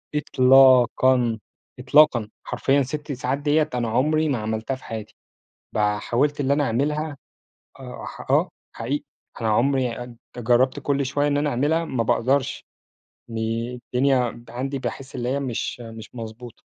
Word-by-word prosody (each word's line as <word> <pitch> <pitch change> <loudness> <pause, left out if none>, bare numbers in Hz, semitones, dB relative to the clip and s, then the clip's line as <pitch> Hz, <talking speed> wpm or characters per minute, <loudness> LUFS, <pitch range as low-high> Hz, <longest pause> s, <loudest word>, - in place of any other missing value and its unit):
إطلاقًا، 130 -3 +4 0.4
إطلاقًا. 125 -4 +4
حرفيًا 140 +1 +1
6 145 +2 -4
ساعات 130 +1 -2
ديّة 150 +1 +1
أنا 120 -2 -1
عمري 155 +6 +2
ما 130 - +1
عملتها 110 +4 -3
في 130 - -16
حياتي، 110 -2 -7 0.6
بقى 105 -1 +1
حاولت 145 +5 0
اللي 140 0 +1
أنا 145 0 +2
أعملها 145 +5 -1 0.6
آه، - - -8
ح - - -7
آه، - - +3 0.3
حقيقي. 135 +6 -3 0.4
أنا 110 - +1
عمري 125 +1 +1
أد 120 -1 -12 0.2
جرّبت 120 +2 +2
كل 140 -1 0
شوية 145 +2 0
إن 145 0 +1
أنا 145 0 +1
أعملها 150 +6 +1
ما 120 -6 -1
باقدرش 130 +4 0 0.6
ني 115 +2 -3
الدنيا 125 -1 0
عندي 135 +3 -3
باحس 135 +1 -6
اللي 125 -1 -3
هي 140 +2 0
مش 125 -1 -3
مش 115 -1 -9
مضبوطة، 115 0 -9
130 Hz, 145 wpm, -23 LUFS, 115-140 Hz, 0.6 s, إطلاقًا